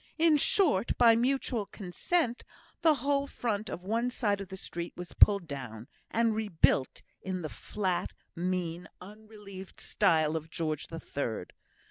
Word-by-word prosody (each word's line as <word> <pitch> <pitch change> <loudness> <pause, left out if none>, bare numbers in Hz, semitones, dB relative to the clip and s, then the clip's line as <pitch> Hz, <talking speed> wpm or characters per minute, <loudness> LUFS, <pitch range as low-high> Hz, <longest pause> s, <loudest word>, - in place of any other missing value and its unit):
In 325 -1 +5
short, 285 - +3
by 230 -2 +7
mutual 245 -3 0
consent, 235 - -1 0.4
the 320 -2 +5
whole 280 0 +2
front 220 -5 -2
of 180 - -6
one 230 +5 0
side 205 -5 0
of 195 - -6
the 190 +1 -8
street 170 -2 -6
was 180 0 -8
pulled 200 -4 +5
down, 125 -6 -7 0.2
and 230 -1 +2
rebuilt 205 -10 +1 0.2
in 185 -2 -4
the 155 - -3
flat, 185 0 -2 0.2
mean, 175 -1 -2
unrelieved 205 -1 -11
style 160 -2 +2
of 160 0 -4
George 155 -2 -3
the 165 - -7
Third. 115 - -4
195 Hz, 145 wpm, -30 LUFS, 170-230 Hz, 0.4 s, by